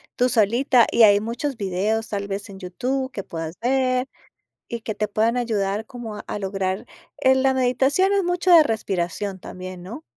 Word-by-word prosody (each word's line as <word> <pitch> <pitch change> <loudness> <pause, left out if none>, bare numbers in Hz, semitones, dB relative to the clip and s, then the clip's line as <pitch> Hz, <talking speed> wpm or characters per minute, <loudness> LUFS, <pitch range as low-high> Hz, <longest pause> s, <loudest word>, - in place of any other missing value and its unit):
tú 250 0 +2
solita. 235 +3 +3
Y 235 - +5
hay 205 -1 +7
muchos 240 +4 -4
videos, 210 +4 -1
tal 200 -1 -3
vez, 200 +1 -5
en 190 -1 -10
YouTube, 260 +8 -3
que 195 - -5
puedas 165 0 -6
ver 255 +1 +1 0.6
y 235 -1 -5
que 220 - -4
te 210 - -1
puedan 225 +4 +1
ayudar, 215 -3 -1
como 230 -5 -7
a 210 - -4
lograr 195 +2 -2 0.4
Eh, 260 0 +5
la 265 0 +2
meditación 265 +9 +2
es 395 -2 +2
mucho 355 +1 +1
de 330 -3 +9
respiración 195 - -2
también, 185 0 -8
¿no? 235 - -8
225 Hz, 175 wpm, -23 LUFS, 195-260 Hz, 0.6 s, de